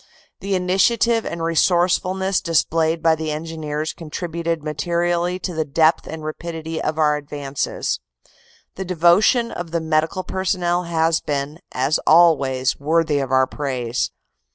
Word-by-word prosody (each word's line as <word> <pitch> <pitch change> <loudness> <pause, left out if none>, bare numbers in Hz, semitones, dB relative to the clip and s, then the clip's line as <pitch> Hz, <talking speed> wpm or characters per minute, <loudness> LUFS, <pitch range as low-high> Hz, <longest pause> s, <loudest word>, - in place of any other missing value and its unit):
The 195 0 -2
initiative 220 +5 +2
and 170 -1 -4
resourcefulness 180 +3 +1
displayed 165 -1 +1
by 165 -1 +5
the 160 0 -3
Engineers 155 -1 -4
con 165 -2 -10
tributed 165 -1 -3
materially 170 +4 -1
to 185 -1 -5
the 160 -1 0
depth 155 +2 +2
and 160 -1 -7
rapidity 160 +1 -5
of 155 0 -2
our 150 -1 +3
advances. 145 -1 -3 0.8
The 190 - -3
devotion 185 +7 +3
of 175 -1 -6
the 170 +1 -1
Medical 160 +3 0
personnel 180 -2 -1
has 165 -1 +1
been, 145 +2 -3
as 135 +4 +1
always, 140 -6 +4
worthy 155 0 +1
of 135 - -2
our 130 0 +4
praise. 130 -3 -2
165 Hz, 135 wpm, -21 LUFS, 150-175 Hz, 0.8 s, by